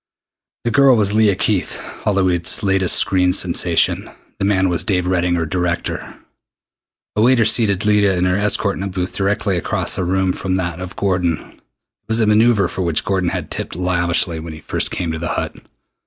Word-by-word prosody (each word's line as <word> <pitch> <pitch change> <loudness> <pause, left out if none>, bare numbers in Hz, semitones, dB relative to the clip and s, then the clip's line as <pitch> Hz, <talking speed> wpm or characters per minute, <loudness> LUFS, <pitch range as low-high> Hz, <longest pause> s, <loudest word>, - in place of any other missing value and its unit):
The 120 - -1
girl 135 +1 +5
was 105 -2 +1
Leah 105 -2 +3
Keith, 100 -1 -1
Hollywood's 95 -4 -1
latest 95 -2 +3
screen 90 -1 +2
sensation. - - +1 0.3
The - - 0
man 95 -2 +2
was 85 -2 -1
Dave 90 -3 0
Redding, 90 -1 +1
her 85 -1 -1
director. 90 0 -3 1.0
A 105 - +1
waiter 120 0 +4
seated 105 -3 +2
Leah 105 -3 +3
and 90 - +1
her 90 0 +1
escort 100 0 +1
in - - -6
a 100 - -2
booth 90 -1 -4
directly 100 -1 0
across 85 - -2
the 95 - -1
room 95 +1 0
from 95 -1 -2
that 90 -2 -3
of 90 0 -7
Gordon. 90 -4 0 0.2
It - - -28 0.5
was 110 +1 +1
a 110 - +3
maneuver 105 0 +3
for 95 - -5
which 85 -4 -1
Gordon 95 -3 0
had - - -5
tipped - - -4
lavishly 85 -1 0
when 80 0 -7
he 80 - -10
first - - -2
came 85 -2 -3
to 80 - -4
the 85 - -3
Hut. - - -4
95 Hz, 190 wpm, -18 LUFS, 90-105 Hz, 1.0 s, girl